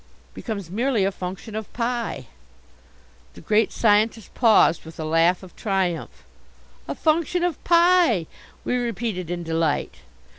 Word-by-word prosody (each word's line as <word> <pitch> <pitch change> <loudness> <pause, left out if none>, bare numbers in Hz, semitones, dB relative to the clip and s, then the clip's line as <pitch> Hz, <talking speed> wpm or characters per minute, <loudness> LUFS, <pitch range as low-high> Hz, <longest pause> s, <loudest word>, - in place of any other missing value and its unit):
"Becomes 200 -7 -6
merely 230 -1 +1
a 195 - +1
function 190 +3 -7
of 220 -1 -6
pi!" 240 0 -3 1.1
The - - -12
Great 215 0 +2
Scientist 220 0 +1
paused 220 -8 +4
with 160 0 -12
a 155 - -3
laugh 165 +4 +2
of 185 - -13
triumph. 190 -5 -2 0.6
"A - - -4
function 335 +2 +1
of 350 -4 -2
pi!" 340 - +4 0.4
we 250 - 0
repeated 225 -7 -3
in 175 -1 -3
delight. 160 -2 -1
210 Hz, 135 wpm, -23 LUFS, 175-240 Hz, 1.1 s, paused